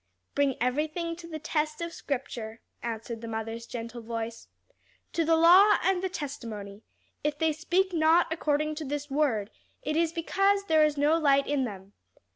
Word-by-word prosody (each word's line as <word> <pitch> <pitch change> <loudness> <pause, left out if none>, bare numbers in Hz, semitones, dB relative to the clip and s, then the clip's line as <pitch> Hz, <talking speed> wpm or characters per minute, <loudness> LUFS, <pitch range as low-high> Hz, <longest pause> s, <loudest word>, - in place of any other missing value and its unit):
"Bring 280 -2 +2
everything 310 +7 -1
to 345 -1 -10
the 320 -2 -5
test 305 0 -2
of 335 0 -4
scripture," 240 -5 -5 0.2
answered 230 0 -5
the 230 - -6
mother's 225 +1 -5
gentle 235 0 -6
voice. 230 0 -5 0.7
"'To 335 - +1
the 325 +1 +4
law 360 +6 +7
and 370 0 +2
the 380 - -1
testimony: 225 - -6 0.4
if 295 0 0
they 320 0 +2
speak 355 +4 0
not 325 +1 +4
according 305 -1 0
to 310 +1 -5
this 290 0 -4
word, 255 -8 +1 0.3
it 305 +2 -1
is 330 0 +2
because 390 +4 +1
there 315 -5 +4
is 300 -1 +2
no 300 +3 +3
light 280 -3 +4
in 285 -3 0
them.' 195 -3 -8
295 Hz, 170 wpm, -28 LUFS, 235-330 Hz, 0.7 s, law